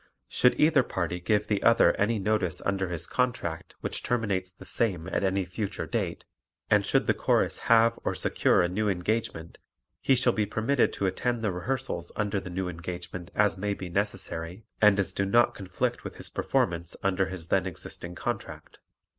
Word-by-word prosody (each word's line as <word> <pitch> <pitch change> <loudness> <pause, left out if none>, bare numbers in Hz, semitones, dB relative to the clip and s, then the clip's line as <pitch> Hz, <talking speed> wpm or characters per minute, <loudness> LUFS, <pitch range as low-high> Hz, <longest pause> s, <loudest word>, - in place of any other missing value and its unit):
Should 125 - +3
either 155 -2 +5
party 90 -6 -3
give 105 +4 +1
the 105 -2 0
other 115 0 +5
any 110 +3 +1
notice 100 -4 0
under 95 -2 0
his 85 -3 -2
contract 120 -10 -2
which - - -3
terminates 100 -6 -1
the 95 - -14
same 95 -8 -1
at - - -1
any 95 0 +1
future 95 +3 -4
date - - -3 0.5
and - - +5
should - - +2
the - - +3
Chorus - - +1
have 115 0 +5
or - - -1
secure - - +3
a - - +2
new 105 +4 0
engagement 90 -3 -2 0.4
he 135 - +4
shall 125 -1 +3
be 105 -1 0
permitted 115 +6 +1
to 100 - -2
attend 115 +5 -1
the 105 - +1
rehearsals 90 -1 -3
under 105 -1 0
the 95 - -8
new 90 +1 -3
engagement 85 0 -6
as 105 -2 +2
may 100 0 -1
be 90 -2 -7
necessary 95 -1 -3 0.2
and 105 -2 +6
as 100 - 0
do 100 - 0
not 120 +5 +4
conflict 95 -2 -3
with - - -7
his - - -4
performance 85 0 -1
under 95 -1 +1
his 90 -3 -7
then 95 -1 +2
existing 85 0 -7
contract. - - -5
95 Hz, 180 wpm, -28 LUFS, 90-110 Hz, 0.5 s, and